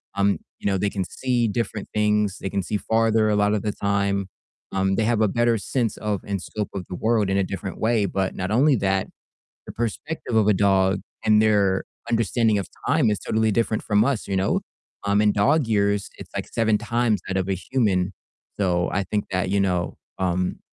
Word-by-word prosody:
Um, 100 -3 +2 0.2
you - - -3
know, 95 -1 +2
they 100 +2 0
can 95 -2 -2
see 120 +4 0
different 110 -1 -3
things. 105 -2 +1
They 95 - -3
can 100 0 -1
see 105 - -3
farther 110 0 +2
a 105 - +2
lot 105 +1 +3
of 105 - 0
the 105 0 -1
time. 100 -1 0 0.5
Um, 95 0 +1
they 110 - +1
have 115 -2 +2
a 110 - +4
better 120 0 +2
sense 115 +2 -1
of 105 -2 -2
and 100 -2 -3
scope 105 0 -4
of 95 - -4
the 90 - -4
world 110 -2 +1
in 95 - +1
a 100 - +3
different 95 +1 -5
way. 110 -2 +2
But 95 -1 -2
not 95 +2 -3
only 135 +5 +4
that, 95 -1 0 0.6
the - - -6
perspective 120 +3 -3
of 110 -2 +4
a 105 - +5
dog 95 0 +3 0.3
and 110 0 +5
their 100 -3 +3 0.3
understanding 115 -1 +2
of 100 - -3 0.2
time 150 -9 +3
is 105 - 0
totally 110 0 +1
different 110 0 0
from 105 0 +3
us, 135 -8 -1
you 100 - -1
know? 95 - +1 0.4
Um, 100 +1 +3
in 105 -1 +4
dog 140 +7 +3
years, 100 -2 +1
it's - - -10
like - - -3
7 110 -2 +2
times 115 -1 0
that 95 0 -1
of 95 0 -1
a 95 - +1
human, 95 -4 0 0.5
so 90 -3 +1
I 100 - 0
think 105 +3 -2
that, 90 0 0
you 100 +1 +1
know, 90 -3 0 0.2
um, 90 0 -1
105 Hz, 210 wpm, -23 LUFS, 95-110 Hz, 0.6 s, a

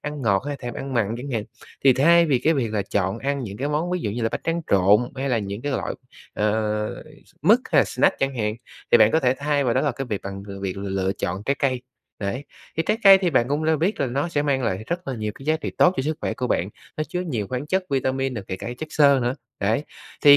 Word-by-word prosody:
ăn 150 -2 -5
ngọt 100 -3 +2
hay 145 - -2
là - - -5
thèm 120 -1 -5
ăn 135 -1 -5
mặn 115 -2 +1
chẳng 140 +2 -6
hạn, 110 -4 -1 0.4
thì 135 - +8
thay 170 +6 +5
vì 135 -5 +3
cái 160 +5 +2
việc 115 -6 -1
là 105 - 0
chọn 95 +2 -1
ăn 140 +1 -1
những 100 -3 -6
cái 140 +3 -2
món 155 +4 -1
ví 180 - -1
dụ 105 - -2
như 115 +2 -3
là 115 - +2
bánh - - -2
tráng 165 +1 0
trộn, 100 +2 +5 0.2
hay 135 +1 -2
là 120 - +2
những 100 +1 -5
cái 145 -1 -2
loại, - - -2 0.4
ờ, 105 0 -1 0.2
s - - -23
mứt - - +6
hay - - +6
snack - - +1
chẳng 135 -1 -1
hạn, 105 -1 -1 0.4
thì - - +8
bạn 105 - +6
có 160 - +3
thể 125 0 +3
thay 145 -1 +1
vào 120 - +1
đó - - +3
là 145 - +1
cái 135 +1 -5
việc 105 -4 -3
bằng 100 0 -6
v 100 - -10
việc 95 -1 -3
lựa 95 -1 -1
chọn 95 +2 -2
trái 140 +4 +1
cây, 130 -4 0 0.4
đấy. 110 +7 -3 0.3
Thì 165 - +2
trái 215 +1 +1
cây 195 -1 +10
thì 180 -3 0
bạn 120 -3 +2
cũng 150 +2 0
đã 160 - +3
là 160 - +3
biết 175 +8 0
là 140 - +2
nó 140 +7 -1
sẽ 145 -3 0
mang 135 -3 +1
lại 110 -2 -1
rất 175 -2 -3
là 130 - -2
nhiều 110 -2 -3
cái 135 - -12
giá 155 0 +3
trị 155 - -5
tốt 180 +1 +5
cho - - 0
sức 155 +2 -2
khỏe - - -2
của 125 - -2
bạn, 95 -5 0 0.3
nó 155 - -1
chứa 180 +5 -4
nhiều 120 - -2
khoáng 130 +3 -3
chất 190 +3 0
vitamin 135 -1 0
rồi 100 - -5
kể 95 - -3
cả 115 - -6
chất 155 - -4
xơ 140 -2 +5
nữa, 120 +2 0 0.3
đấy. 110 +9 +1 0.4
Thì 145 0 +10
130 Hz, 285 wpm, -23 LUFS, 105-150 Hz, 0.4 s, cây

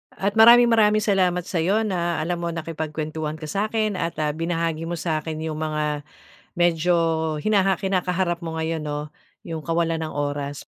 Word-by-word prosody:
At 200 +3 -1
maraming, 235 +1 +8
maraming 215 -1 +4
salamat 185 -3 +2
sa'yo 185 +5 0
na 175 -6 -1
alam 175 +1 -2
mo 170 - -3
nakipagkuwentuhan 155 -1 -4
ka 160 - -12
sa'kin 210 +4 -1
at 165 - -2
ah, 150 - +1
binahagi 165 0 -2
mo 175 - -2
sa 160 -1 -1
akin 155 +1 -5
'yong 155 -1 -4
mga 155 -1 -1 0.8
medyo 175 0 +3 0.4
hinaha 195 0 +2
kinakaharap 180 -2 -1
mo 160 -1 -4
ngayon, 160 -1 -2
'no, 150 0 -4 0.4
'yong 160 -2 -5
kawalan 165 0 0
ng 155 - -5
oras. 145 -1 -3
170 Hz, 160 wpm, -23 LUFS, 155-190 Hz, 0.8 s, maraming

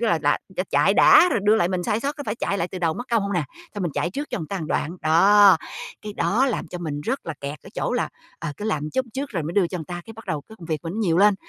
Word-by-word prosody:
tức 235 - +1
là 170 - +3
đã 145 -1 +2
đã 190 0 -3
chạy 150 +8 +4
đã 360 - +7
rồi 230 - +1
đưa 215 +1 +5
lại 175 - +2
mình 185 -1 -1
sai 210 +5 0
sót 285 +3 -2
có 290 - -5
phải 210 - -1
chạy 200 -3 -1
lại 170 - -1
từ 185 - -6
đầu 165 -2 0
mất 245 - -5
công 230 -3 +3
hông 200 0 -2
nè, 175 -5 0 0.3
xong 205 - -3
mình 170 -5 -2
chạy 175 - -1
trước 285 +9 -5
cho - - -2
người 160 - -5
ta 195 - -4
một 155 - -4
đoạn. 165 +5 -1
Đó, 195 +4 +6 0.5
cái 210 - -6
đó 235 +5 +2
làm 235 -10 -2
cho 180 - -6
mình 150 -4 -4
rất 255 - -3
là 165 - -3
kẹt 140 +1 -5
ở - - -12
chỗ - - -1
là, - - 0 0.3
ờ, 165 -2 -4
cứ 210 - -6
làm 155 -8 -1
chút 260 +5 -1
trước 275 +1 -3
rồi 170 -7 -2
mới 160 - -4
đưa 190 -1 +3
cho 180 - -4
người 160 - -6
ta, 175 +2 -6
cái 225 - -9
bắt 225 0 -13
đầu 150 -2 -2
cái 220 - -12
công 165 - -10
việc 155 -2 -1
mình 165 - -4
nó 220 - -2
nhiều 175 -5 +2
lên, 205 +1 +6
185 Hz, 335 wpm, -23 LUFS, 165-215 Hz, 0.5 s, đã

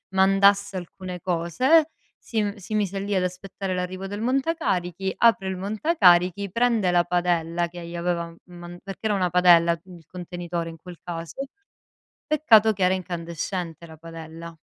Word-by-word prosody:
mandasse 195 +1 +4
alcune 180 0 -7
cose, 255 - +2 0.3
si 225 -2 -2
m 205 0 -2
si 200 0 -9
mise 200 -2 -1
lì 200 +1 -3
ad 185 - +2
aspettare 185 +1 -4
l'arrivo 185 +1 -4
del 205 +2 -5
montacarichi, 210 - -1
apre 230 -5 +3
il 190 -1 -3
montacarichi, 200 - +3
prende 230 -3 +2
la 175 -1 +3
padella 175 -1 0
che 175 0 -9
gli 170 +1 -8
aveva 170 0 -1
m - - -17 0.2
man 175 0 -10
perché 195 +2 -9
era 210 - +1
una 185 -2 +1
padella, 170 -1 +5
il 175 -3 -14
contenitore 175 -1 -5
in 165 - -10
quel 175 +1 -12
caso. 175 +9 -6 0.8
Peccato 225 -8 +5
che 190 -3 -1
era 185 - +3
incandescente 170 -1 -5
la 160 -1 -13
padella. 165 0 -10
180 Hz, 160 wpm, -24 LUFS, 170-200 Hz, 0.8 s, padella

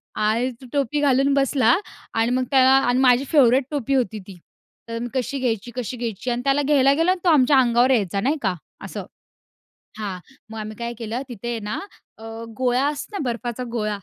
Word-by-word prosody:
आणि 225 +4 +1
तो 260 - -11
टोपी 285 +1 0
घालून 275 0 +3
बसला. 270 -3 +3 0.4
आणि 225 +2 +1
मग 255 0 +1
त, - - +2
अ, 260 -1 +5
माझी 255 0 +4
फेव्हरेट 265 -3 +5
टोपी 275 -2 -1
होती 220 -4 0
ती, 190 -3 -11 0.5
तर 230 0 -4
मी 240 - -3
कशी 265 +1 -2
घ्यायची, 240 -2 -2
कशी 250 0 -4
घ्यायची? 235 0 -4
आणि 240 +1 -2
त्याला 275 +1 +3
घ्यायला 275 -1 +4
गेलो 330 +5 +2
आणि 370 - -1
तो 350 - +5
आमच्या 275 -2 +5
अंगावर 245 +1 +3
यायचा 200 -5 +1
नाही 290 +6 +1
का 190 -4 0 0.3
असं, - - -6 0.9
हां. 195 -3 -4 0.3
मग 225 - -8
आम्ही 215 0 -6
काय 235 0 -4
केलं 230 +3 -4
तिथे 240 +1 -4
ना, 210 +1 -3 0.4
अ, 220 - -14 0.3
गोळा 255 +1 +1
असतो 300 +8 -4
ना 295 - -3
बर्फाचा 240 +1 -4
गोळा. 215 -3 -1
250 Hz, 195 wpm, -22 LUFS, 230-275 Hz, 0.9 s, अ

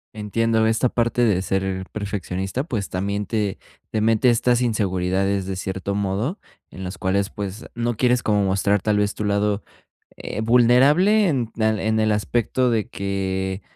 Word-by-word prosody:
Entiendo 110 +1 +1
esta 115 +3 +2
parte 120 0 +1
de 100 -5 +2
ser 95 0 -2
perfeccionista, 100 +2 -3
pues 115 - -3
también 100 +2 -2
te 105 -1 -2 0.3
te 110 - 0
mete 115 +3 +3
estas 120 +1 +2
inseguridades 95 -3 0
de 95 0 -4
cierto 95 +1 -3
modo, 100 - -2 0.3
en 95 - -7
las 90 +1 -6
cuales, 100 +2 0
pues, 105 0 -6
no 120 -1 -1
quieres 125 0 +2
como 105 -1 +2
mostrar 100 +1 +1
tal 105 +1 +1
vez 105 0 +1
tu 105 - -4
lado, 105 0 +1 0.6
eh, 110 - -5
vulnerable 135 - +4
en 125 -8 -1
al 110 -2 +1
en 110 0 0
el 110 -1 +2
aspecto 120 +5 0
de 110 -3 -1
que, 95 -1 -3
105 Hz, 160 wpm, -22 LUFS, 95-115 Hz, 0.6 s, vulnerable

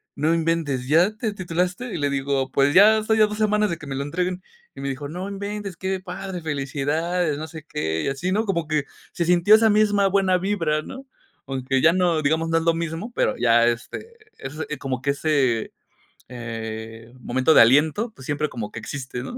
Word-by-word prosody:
"No 155 +3 +1
inventes, 160 -6 -1
¿ya 175 +8 +3
te 220 -1 -3
titulaste?" 185 +5 -2
Y - - -3
le 145 - 0
digo: 135 -1 -1
"Pues 140 +2 +2
ya 210 +4 +7
estoy 220 0 +1
a 215 - +6
2 210 0 -6
semanas 210 -1 +2
de 170 - -3
que 150 - -11
me 135 - -4
lo 140 - -2
entreguen". 180 +5 -2 0.3
Y - - -9
me 140 - -3
dijo: 140 +2 -5
"No 180 +5 -5
inventes, 200 -2 -5
qué 190 0 -2
padre, 185 0 -6
felicidades.", 150 +3 -1
no 155 - -5
sé 160 -1 -10
qué, 80 - -2
y - - -2
así, 140 +7 -2
¿no?, 215 +4 +1
como 170 -6 -1
que 150 -2 0 0.3
se 170 - -1
sintió 180 +4 +5
esa 220 0 +4
misma 205 -1 +3
buena 190 -1 +2
vibra, 170 -6 0
¿no?, 265 - -10 0.4
aunque 135 0 -1
ya 165 +3 +5
no, 175 -3 +2
digamos, 160 +3 +1
no 165 - +2
es 165 - 0
lo 165 0 +3
mismo, 165 +7 -4
pero - - +1
ya, 115 -1 +4
este, 120 - -4 0.2
es 135 +2 -7 0.2
como 130 -2 -3
que 140 +2 +1
ese, 140 -6 0 0.6
eh, 115 -1 -7
momento 130 +5 +2
de - - +8
aliento, 155 - +3
pues 130 - -12
siempre 145 +1 -1
como 110 -4 -6
que - - -7
existe, 125 +1 -6
¿no? 245 - -7
160 Hz, 210 wpm, -23 LUFS, 135-190 Hz, 0.6 s, de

